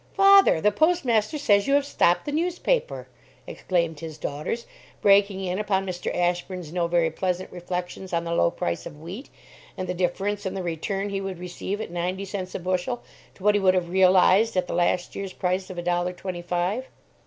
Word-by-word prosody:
"Father, 390 - +7
the 210 +6 +3
postmaster 300 - +2
says 205 -7 +3
you 275 - +4
have 285 0 +2
stopped 175 -10 +2
the 295 - -3
newspaper!" 360 +10 -1 0.4
exclaimed 170 -4 -1
his 160 -1 -7
daughters, 150 +11 -4 0.3
breaking 200 -1 +4
in 185 +1 -2
upon 195 -2 0
Mr. 180 -2 -3
Ashburn's 175 -1 -2
no 175 -1 0
very 170 -1 +2
pleasant 185 +2 -2
reflections 180 +1 -5
on 170 -1 0
the 170 0 -3
low 85 - +3
price 85 0 -3
of 150 - -11
wheat, 185 - -8 0.5
and 185 - -4
the 180 - -1
difference 195 +3 -1
in 190 -1 -3
the 190 - -3
return 195 +4 -2
he 195 -1 -2
would 195 -2 -5
receive 180 +3 -5
at 220 - -5
ninety 180 +3 -2
cents 190 -1 -5
a - - -2
bushel 185 +7 -2 0.3
to 190 - -15
what 210 0 +5
he 205 - +2
would 185 -1 +4
have 175 -2 0
realized 190 +3 +4
at 180 - +2
the - - -5
last 175 0 0
year's 195 -2 -5
price 185 +1 -1
of 185 - -8
a 175 - -3
dollar 175 +1 0
twenty 180 -1 -6
five. 180 +8 -1
185 Hz, 200 wpm, -25 LUFS, 175-205 Hz, 0.5 s, Father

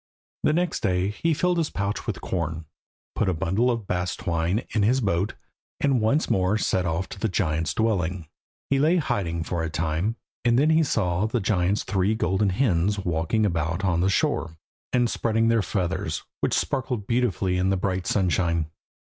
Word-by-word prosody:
The - - +3
next 175 +1 0
day 90 +1 +1
he 135 +11 -1
filled 180 +2 +1
his 160 - 0
pouch 100 +1 -3
with - - -3
corn, 80 -2 -3 0.5
put 100 - 0
a 90 - 0
bundle 95 +10 +1
of 115 -4 -1
bast 90 -1 -2
twine 85 +5 0
in 110 - +1
his 120 +6 +3
boat, 100 -3 0 0.4
and 135 -5 +2
once 115 +8 +2
more 95 +3 +2
set 95 -4 0
off 85 +3 -1
to 100 - -8
the 110 - 0
giant's 80 -4 0
dwelling. 95 -6 0 0.4
He 135 - +3
lay 155 +5 +4
hiding 85 - -1
for 85 0 -2
a 80 - -2
time, 80 +7 -1 0.3
and 120 -1 +3
then 150 +4 +4
he 160 +1 +4
saw 100 - +1
the 120 +2 0
giant's 95 -1 +1
three 100 +2 +1
golden 95 0 +1
hens 100 -2 +1
walking 90 +3 0
about 85 0 -1
on 85 -2 +2
the 95 - +2
shore, 80 -3 0 0.3
and 120 -1 +3
spreading 115 0 +1
their 115 -1 +3
feathers, 95 -3 -2 0.2
which - - +1
sparkled 125 -6 -1
beautifully 100 -6 0
in 95 +1 +2
the 95 - +2
bright 95 -1 -2
sunshine. 85 -5 +1
95 Hz, 180 wpm, -25 LUFS, 85-115 Hz, 0.5 s, lay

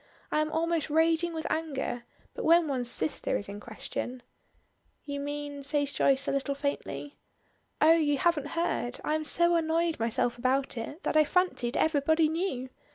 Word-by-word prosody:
I 305 - +2
am 310 0 -1
almost 330 -1 0
raging 325 +2 +2
with 320 -1 -5
anger, 275 -6 -2 0.3
but - - -5
when 335 0 +5
one's 255 -4 0
sister 155 -9 0
is 200 - -7
in 200 +1 -7
question 240 +3 -6 0.4
" - - -43
"You 285 -1 -4
mean?" 290 0 -4
say 285 +1 0
Joyce 275 -1 +1
a - - +1
little 275 0 -1
faintly. 285 0 -4 0.6
"Oh, 315 +1 +7
you 300 -3 +2
haven't 300 -1 +1
heard. 330 -7 -1
I 305 - 0
am 310 0 0
so 345 +3 +3
annoyed 330 -1 +1
myself 235 +1 0
about 265 +3 +1
it, 270 +8 -6
that - - -1
I 310 - +7
fancied 300 -7 0
everybody 315 +1 +3
knew. 315 -6 -2
290 Hz, 170 wpm, -29 LUFS, 270-320 Hz, 0.6 s, Oh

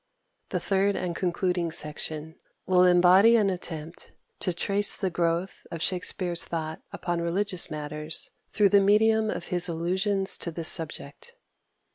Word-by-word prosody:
The - - -2
third 195 0 +1
and 175 -2 -3
concluding 180 -1 -1
section, 155 0 -2 0.3
will 180 -1 +4
embody 180 +5 +6
an 205 -4 +3
attempt 165 -2 -7 0.3
to 180 - -1
trace 200 +4 +2
the 190 -3 -3
growth 170 +2 -2
of 165 - -6
Shakspere's 180 0 0
thought 160 -1 -5
upon 175 -1 -3
religious 180 +1 +1
matters 150 +1 -4 0.2
through 205 -2 +3
the 200 0 +5
medium 215 +2 +3
of 175 - -5
his 180 -1 0
allusions 190 +4 0
to - - -4
this 165 0 -1
subject. 165 - -4
180 Hz, 140 wpm, -26 LUFS, 165-195 Hz, 0.3 s, embody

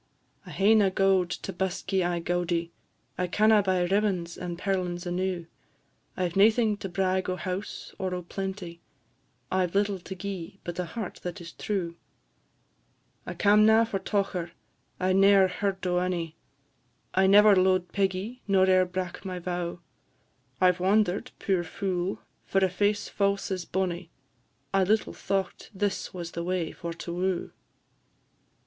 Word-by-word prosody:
"I - - -8
hae 200 +3 +4
na 210 -3 +5
gowd 190 -1 +2
to - - -5
busk 190 +1 -3
ye 190 - +3
aye 175 0 0
gaudie; 170 -1 -1 0.5
I 180 - +1
canna 215 +3 +4
buy 185 -2 +1
ribbons 185 -3 0
and 175 -1 -5
perlins 180 -2 -2
enew; 180 -1 -2 0.7
I 185 - +1
've 170 - -9
naething 215 +2 +4
to 195 - -6
brag 185 0 0
o' 185 - 0
house, 185 +2 -5
or 185 -1 -2
o' 180 - -5
plenty, 190 -2 -5 0.7
I 185 -1 +2
've 170 - -14
little 200 -1 +1
to 190 +2 -8
gi'e, 190 -1 -6
but 175 0 -5
a 180 - 0
heart 205 +3 -6
that 175 -1 -5
is 170 -1 -9
true. 175 -5 -3 1.3
I - - -5
cam' 210 +1 +5
na 220 +1 +6
for 200 -3 -3
tocher 190 -4 -2 0.5
I 185 0 +2
ne'er 195 0 +6
heard 190 +1 -2
o' 180 0 +2
onie; 175 -3 -2 0.8
I 190 0 +4
never 205 +1 +7
lo'ed 185 -1 +2
Peggy, 200 +5 -1
nor 190 -2 +4
e'er 185 -1 +5
brak 180 -1 -5
my 185 -2 -4
vow: 175 -1 -4 0.8
I 185 0 +6
've 180 - -10
wander'd, 200 +4 +2
puir 190 -3 0
fule! 180 +2 -3 0.2
for - - -1
a - - 0
face 205 +3 0
fause 200 -1 0
as 185 -2 -2
bonnie: 180 -2 -2 0.6
I 195 -1 +4
little 210 +3 +1
thocht 195 -2 -3
this 205 +1 -1
was 175 -2 -6
the 170 - -4
way 180 -2 -1
for 170 - -6
to 170 +1 -6
woo." 180 0 -1
185 Hz, 160 wpm, -27 LUFS, 175-195 Hz, 1.3 s, never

